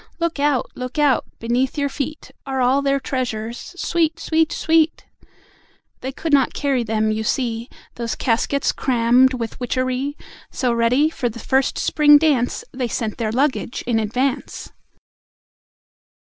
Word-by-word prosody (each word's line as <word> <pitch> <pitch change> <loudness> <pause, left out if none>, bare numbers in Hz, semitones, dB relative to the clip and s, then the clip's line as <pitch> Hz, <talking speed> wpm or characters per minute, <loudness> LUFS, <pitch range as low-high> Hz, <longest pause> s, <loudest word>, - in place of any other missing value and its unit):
Look 335 -3 -2
out! 285 -3 +1
Look 255 +3 -6
out! 290 -4 +3
Beneath 245 +4 -1
your 285 -1 +1
feet, 285 +2 -5 0.2
Are 265 -1 -2
all 255 +2 +3
their 275 0 +1
treasures: 240 +2 -4
Sweet! 330 -1 0
Sweet! 320 -1 +1
Sweet! 320 0 +1 0.9
They 260 - -4
could 310 +3 -4
not 275 -2 +3
carry 275 -3 0
them, 220 -1 0
you 215 0 -2
see, 235 0 -2 0.2
Those 235 -1 -3
caskets 270 +3 0
crammed 255 +1 +3
with 230 -3 -5
witchery, 255 +3 -2 0.3
So 250 -2 0
ready 250 +7 +2
for 250 -6 -2
the 230 - -9
first 265 +3 0
Spring 295 -1 +5
dance, 285 -6 +1
They 255 -1 -2
sent 225 -2 -3
their 220 -2 -1
Luggage 260 0 -1
in 235 -2 +1
Advance!" 245 +5 -2
260 Hz, 145 wpm, -21 LUFS, 235-285 Hz, 0.9 s, Spring